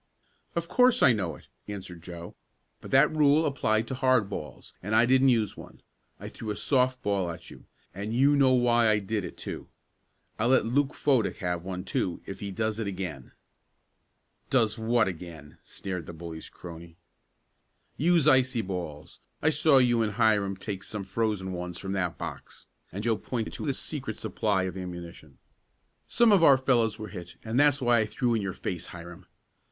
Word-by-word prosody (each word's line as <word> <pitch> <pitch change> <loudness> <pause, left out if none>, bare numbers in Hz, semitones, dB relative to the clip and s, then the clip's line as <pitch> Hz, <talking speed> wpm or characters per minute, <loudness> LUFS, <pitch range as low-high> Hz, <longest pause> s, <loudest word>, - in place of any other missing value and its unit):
"Of 170 0 -2
course 250 +4 +4
I 125 - +7
know 95 -7 -2
it," - - -16 0.2
answered 95 -4 -8
Joe. 85 0 -9 0.5
"But - - -11
that 140 +4 +4
rule 150 +1 +4
applied 115 -6 0
to - - -4
hard 130 -6 +2
balls, 75 -6 -7
and 105 +3 -1
I 115 +2 +6
didn't 130 +2 +4
use 115 -4 +1
one. - - -13 0.4
I - - -7
threw 110 - -7
a 105 - -2
soft 130 0 +1
ball 100 -3 0
at 85 0 -9
you, - - -14 0.3
and 100 +4 -5
you 135 +5 +4
know 135 -2 +4
why 120 -2 +4
I 105 - +4
did 105 0 -2
it, - - -8
too. - - -7 0.7
I'll 110 - +2
let 130 -3 +4
Luke 135 +5 +1
Fodick 130 -7 +1
have 90 -2 -2
one, 90 0 -5
too, 90 -2 -2
if 95 -1 -7
he 100 - -5
does 110 +2 -2
it 110 - -2
again." 90 -9 -6 1.2
"Does 115 -5 +2
what 115 0 +2
again?" 80 -5 -8
sneered 90 -4 -6
the 85 - -7
bully's 80 -1 -8
crony. 85 -1 -11 1.0
"Use 165 0 +3
icy 130 -4 +4
balls. 85 -6 -6 0.2
I 155 - +2
saw 150 -1 +4
you 120 -3 +4
and 105 -2 0
Hiram 105 -4 +2
take 95 0 -5
some 105 -2 -5
frozen 100 -1 -2
ones 90 0 -5
from 95 - -5
that 90 -3 -1
box," - - -8 0.3
and 100 +4 -5
Joe 115 -1 +1
pointed 115 0 -4
to - - -5
the 140 - 0
secret 135 -9 -5
supply 100 -4 0
of 95 0 -4
ammunition. 85 -5 -8 0.7
"Some 235 -2 +4
of 195 -5 +5
our 140 -4 +8
fellows 120 -4 +2
were 110 -2 -7
hit 90 -3 -9
and 115 +4 0
that's 145 -2 +4
why 120 -1 +4
I 105 - +1
threw 120 +1 0
in 110 - +1
your 95 -2 -3
face, 90 -2 -5
Hiram. 85 0 -11
110 Hz, 185 wpm, -28 LUFS, 90-130 Hz, 1.2 s, our